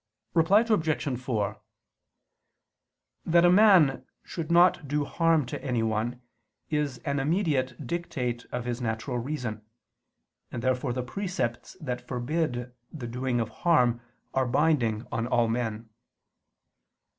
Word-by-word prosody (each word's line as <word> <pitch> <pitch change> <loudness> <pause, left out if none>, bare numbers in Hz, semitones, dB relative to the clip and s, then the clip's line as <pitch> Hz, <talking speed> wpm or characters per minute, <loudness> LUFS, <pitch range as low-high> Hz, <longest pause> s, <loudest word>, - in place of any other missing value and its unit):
Reply 175 +6 +5
Obj. 160 - 0
4: 110 -6 -2 1.6
That 170 +1 +4
a 175 - +6
man 185 -9 +6 0.2
should 165 -2 -5
not 175 -3 +5
do 145 +1 0
harm 165 -1 +2
to 125 - -6
anyone 120 -1 -1 0.5
is 150 -4 0
an 140 0 0
immediate 145 -4 0
dictate 125 -6 -3
of 125 -1 -3
his 120 0 -3
natural 115 +2 -2
reason: 120 -5 -4 0.9
and 120 - -5
therefore 130 0 0
the 125 +1 -2
precepts 125 -4 -3
that 125 -7 -5
forbid 125 -1 -2 0.2
the 145 -7 -7
doing 125 +1 -1
of 115 -1 -1
harm 120 -4 +2 0.3
are 130 -1 +1
binding 125 -5 +1
on 115 +1 -1
all 120 -2 +2
men. 115 -1 -2
130 Hz, 120 wpm, -27 LUFS, 120-160 Hz, 1.6 s, a